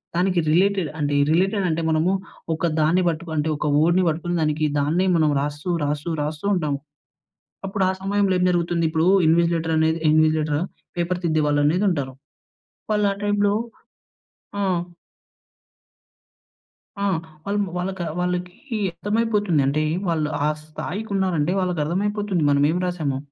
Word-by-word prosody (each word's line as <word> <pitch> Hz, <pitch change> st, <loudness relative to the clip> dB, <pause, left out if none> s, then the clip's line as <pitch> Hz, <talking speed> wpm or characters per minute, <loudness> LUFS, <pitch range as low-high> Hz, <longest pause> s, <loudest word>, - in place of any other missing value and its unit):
దానికి 180 Hz, 0 st, +2 dB
రిలేటెడ్ 190 Hz, -1 st, +2 dB
అంటే 145 Hz, -1 st, 0 dB, 0.2 s
రిలేటెడ్ 190 Hz, +3 st, +2 dB
అంటే 160 Hz, +1 st, -1 dB
మనము 160 Hz, +3 st, +2 dB, 0.4 s
ఒక 160 Hz, -, -6 dB, 0.2 s
దాన్ని 170 Hz, +4 st, +3 dB
పట్టుకు 165 Hz, 0 st, -5 dB
అంటే 155 Hz, +1 st, 0 dB
ఒక 150 Hz, -, -2 dB
వర్డ్‌ని 170 Hz, +4 st, +3 dB
పట్టుకొని 170 Hz, +2 st, -2 dB
దానికి 155 Hz, 0 st, +1 dB
దాన్నే 165 Hz, +7 st, +1 dB
మనం 155 Hz, -2 st, +3 dB
రాస్తూ, 145 Hz, +4 st, -4 dB, 0.2 s
రాస్తూ, 150 Hz, +3 st, -2 dB
రాస్తూ 150 Hz, +5 st, -5 dB
ఉంటాము. 150 Hz, -6 st, -1 dB, 0.9 s
అప్పుడు 195 Hz, 0 st, -1 dB
ఆ -, -, +2 dB
సమయంలో 200 Hz, 0 st, +1 dB
ఏం 180 Hz, -, +1 dB
జరుగుతుంది? 170 Hz, -1 st, 0 dB
ఇప్పుడు 160 Hz, +2 st, +1 dB, 0.2 s
ఇన్విసిలేటర్ 165 Hz, 0 st, +2 dB
అనేది 160 Hz, +1 st, +2 dB
ఇన్విసిలేటరా 155 Hz, -1 st, +2 dB, 0.4 s
పేపర్ 175 Hz, +1 st, -1 dB
తిద్దే 155 Hz, -2 st, +1 dB
వాళ్ళు 145 Hz, 0 st, +2 dB
అనేది 180 Hz, +7 st, +2 dB
ఉంటారు. 140 Hz, -7 st, -2 dB, 0.8 s
వాళ్ళు 210 Hz, -1 st, +2 dB
ఆ -, -, -4 dB
టైమ్‌లో 205 Hz, 0 st, +2 dB, 1.1 s
ఆ! -, -, 0 dB, 2.4 s
ఆ! -, -, -2 dB, 0.4 s
వలము 200 Hz, -1 st, -1 dB
వాలక 185 Hz, +1 st, -3 dB, 0.2 s
వాళ్ళకి 180 Hz, +8 st, -3 dB, 0.2 s
అర్థమైపోతుంది. 210 Hz, -6 st, +1 dB
అంటే 150 Hz, +3 st, +1 dB, 0.2 s
వాళ్ళు 155 Hz, -2 st, 0 dB, 0.2 s
ఆ -, -, +3 dB, 0.2 s
స్థాయికి 180 Hz, +7 st, -6 dB
ఉన్నారంటే 180 Hz, -4 st, +1 dB
వాళ్ళకి 180 Hz, -3 st, -1 dB
అర్థమైపోతుంది 195 Hz, +1 st, -1 dB
మనం 140 Hz, 0 st, +3 dB
ఏమి 175 Hz, +3 st, 0 dB
రాసామో. 155 Hz, -7 st, -2 dB
170 Hz, 135 wpm, -23 LUFS, 155-190 Hz, 2.4 s, దాన్ని